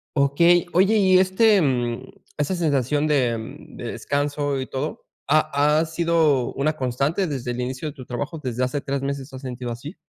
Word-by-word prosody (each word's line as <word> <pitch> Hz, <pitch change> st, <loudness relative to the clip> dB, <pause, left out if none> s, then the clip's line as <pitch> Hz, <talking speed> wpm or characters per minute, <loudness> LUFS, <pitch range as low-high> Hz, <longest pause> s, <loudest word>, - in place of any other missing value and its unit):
Okey. 165 Hz, +5 st, +4 dB
Oye, 195 Hz, +5 st, +4 dB
y, 190 Hz, -2 st, +5 dB
este, 190 Hz, +2 st, +4 dB
mm, 120 Hz, -4 st, 0 dB, 0.3 s
esa 150 Hz, +5 st, 0 dB
sensación 145 Hz, -2 st, +1 dB
de 125 Hz, -6 st, +2 dB, 0.3 s
de -, -, -7 dB
descanso 145 Hz, -1 st, -1 dB
y 130 Hz, -, -4 dB
todo, 135 Hz, +3 st, -5 dB, 0.2 s
¿ha 150 Hz, 0 st, +3 dB
ha 160 Hz, -, +1 dB
sido 160 Hz, -5 st, +1 dB
una 150 Hz, +3 st, +1 dB
constante 140 Hz, +7 st, -1 dB
desde 130 Hz, -5 st, -3 dB
el 120 Hz, +1 st, -3 dB
inicio 130 Hz, +4 st, -4 dB
de 145 Hz, -, -6 dB
tu 130 Hz, -4 st, -11 dB
trabajo? 145 Hz, +7 st, -4 dB
¿Desde 125 Hz, -1 st, -3 dB
hace 140 Hz, +3 st, -3 dB
3 135 Hz, 0 st, -3 dB
meses 140 Hz, 0 st, -4 dB
te 130 Hz, -, -11 dB
has -, -, -11 dB
sentido 125 Hz, -2 st, -5 dB
así? 130 Hz, -, -8 dB
145 Hz, 185 wpm, -23 LUFS, 130-160 Hz, 0.3 s, y